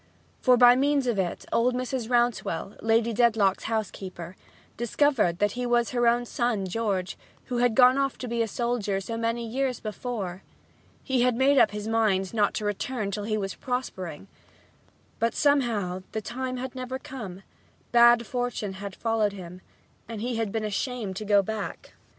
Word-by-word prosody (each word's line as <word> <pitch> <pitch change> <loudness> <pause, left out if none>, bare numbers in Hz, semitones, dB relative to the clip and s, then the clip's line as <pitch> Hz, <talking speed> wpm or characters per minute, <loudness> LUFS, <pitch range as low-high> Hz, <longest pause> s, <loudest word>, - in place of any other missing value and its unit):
For 250 -2 +5
by 245 0 +8
means 280 +1 +2
of 235 -5 0
it 180 -2 -2
old 245 +2 +2
Mrs. 250 -2 -3
Rouncewell, 240 -6 0
Lady 225 +1 +2
Dedlock's 220 -4 +2
housekeeper, 190 -5 -4 0.4
discovered 235 - +1
that 205 +1 +1
he 250 +3 -4
was 240 -1 +1
her 240 -2 +2
own 240 +1 +3
son 235 -5 -1
George, 190 -2 -2 0.3
who 250 - -3
had 245 -2 +2
gone 255 +1 +6
off 275 -1 0
to 250 - -6
be 235 0 -1
a 225 - +1
soldier 225 -4 -1
so 225 +4 -5
many 230 +1 -1
years 255 +2 -1
before. 210 -4 -5 0.6
He 260 -3 +1
had 250 -1 +3
made 270 +2 +4
up - - +6
his 210 +1 -6
mind 215 -4 +1
not 210 -3 +1
to 210 - -2
return 205 +1 -2
till 205 +1 -4
he 215 0 0
was 195 -2 -3
prospering. 195 - -5 0.9
But 230 0 0
somehow 230 -11 +1
this 220 - -3
time 255 +3 -4
had 255 0 -5
never 255 0 -4
come; 210 -9 -8 0.5
bad 240 0 +6
fortune 245 -5 -3
had 200 -1 -6
followed 225 -3 0
him 180 -1 -9 0.5
and 225 -2 -5
he 240 +2 -2
had 225 -3 -1
been 220 0 -2
ashamed 215 -1 -3
to 215 - -5
go 200 -1 +4
back. 215 0 -5
230 Hz, 175 wpm, -26 LUFS, 205-245 Hz, 0.9 s, by